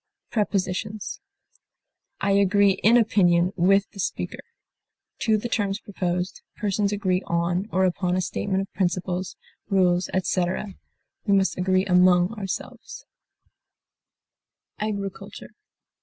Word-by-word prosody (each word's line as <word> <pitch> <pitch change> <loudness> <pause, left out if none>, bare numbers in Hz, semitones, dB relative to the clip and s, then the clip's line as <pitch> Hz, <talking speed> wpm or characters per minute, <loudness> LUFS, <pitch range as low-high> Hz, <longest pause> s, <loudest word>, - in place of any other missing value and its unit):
Prepositions: 205 0 -2 1.0
I 200 - +1
agree 200 0 +4
in 230 +3 +6
opinion 180 -5 +3
with 195 +3 +3
the 200 - -13
speaker; - - -3 0.8
to 220 -2 +2
the 215 - -4
terms 200 -3 -1
proposed; 180 -3 -3
persons 205 -1 0
agree 190 -3 0
on 175 +3 0
or 190 0 +2
upon 180 0 0
a 185 - +1
statement 190 +1 -1
of 195 - -8
principles, 180 0 -2 0.3
rules, 180 -2 +2
etc.; 185 +2 -1 0.5
we 200 - +4
must 195 0 +2
agree 185 +1 +1
among 180 +1 +4
ourselves. 210 - -6 1.7
AGRICULTURE. 200 -2 -5
190 Hz, 110 wpm, -24 LUFS, 180-205 Hz, 1.7 s, in